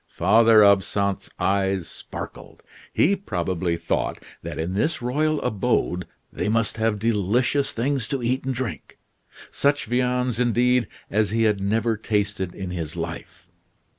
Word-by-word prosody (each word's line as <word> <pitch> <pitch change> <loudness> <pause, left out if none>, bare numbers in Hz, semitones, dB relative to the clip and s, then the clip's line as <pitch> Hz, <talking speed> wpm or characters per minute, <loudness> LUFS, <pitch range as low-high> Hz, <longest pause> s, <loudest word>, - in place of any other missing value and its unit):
Father 110 +4 +5
Absinthe's 100 0 +2
eyes 95 -3 0
sparkled. - - -9 0.3
He 195 +6 +3
probably 90 - -2
thought 85 - -1 0.2
that - - -6
in 80 +3 -2
this 155 - 0
royal 150 +5 0
abode 95 -5 0 0.3
they - - -2
must 115 0 0
have 110 -1 +1
delicious 115 +6 +1
things 130 -1 -1
to 135 -3 -3
eat 125 +3 0
and 130 -1 -2
drink 125 -2 -5 0.5
such 145 +1 +1
viands, 125 0 0
indeed, 125 0 +2 0.2
as 105 0 +2
he 115 +2 +1
had 105 -3 +2
never 110 +3 +1
tasted 105 -4 -2
in 95 -2 -5
his 80 -4 -4
life. - - -6
110 Hz, 135 wpm, -24 LUFS, 100-125 Hz, 0.5 s, Father